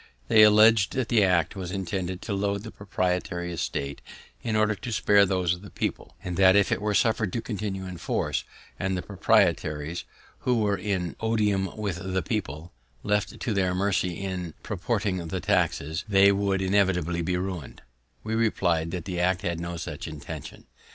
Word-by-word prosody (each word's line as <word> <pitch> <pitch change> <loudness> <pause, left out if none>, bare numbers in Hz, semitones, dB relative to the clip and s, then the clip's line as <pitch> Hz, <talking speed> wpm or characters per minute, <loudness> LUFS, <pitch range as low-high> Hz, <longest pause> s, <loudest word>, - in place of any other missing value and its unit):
They 110 - +7
alledg'd 110 -1 +6
that 130 -3 -1
the 110 -3 +4
act 90 -3 +2
was 95 -3 -5
intended 95 -1 -3
to 105 - -3
load 100 0 -1
the 110 - -8
proprietary 90 -2 -2
estate 70 -3 -3 0.4
in 110 - -2
order 110 0 +3
to 120 +4 -7
spare 100 -2 +4
those 90 -2 +1
of 90 - -7
the 100 - -11
people, - - -4
and 90 -1 -4
that 95 0 +6
if 100 -2 +4
it - - 0
were 105 0 0
suffer'd 110 -3 +2
to - - 0
continue 100 -4 -4
in 90 -1 -7
force, - - -1 0.4
and 95 0 -1
the 90 - -4
proprietaries, 85 -6 +1 0.4
who 125 - +1
were 105 -2 +2
in 90 -3 -2
odium 105 -4 0
with 100 -5 -2 0.2
the 95 - 0
people, 85 - -4 0.3
left 105 -3 -1
to 115 - -1
their 95 -2 +1
mercy 90 -2 +1
in 90 -4 -4
proportioning 100 -3 -2
the 95 +3 -3
taxes, 80 -2 0
they 100 0 +6
would 100 -1 0
inevitably 90 -3 +1
be 90 +2 0
ruined. 90 -7 -5
95 Hz, 150 wpm, -26 LUFS, 90-105 Hz, 0.4 s, They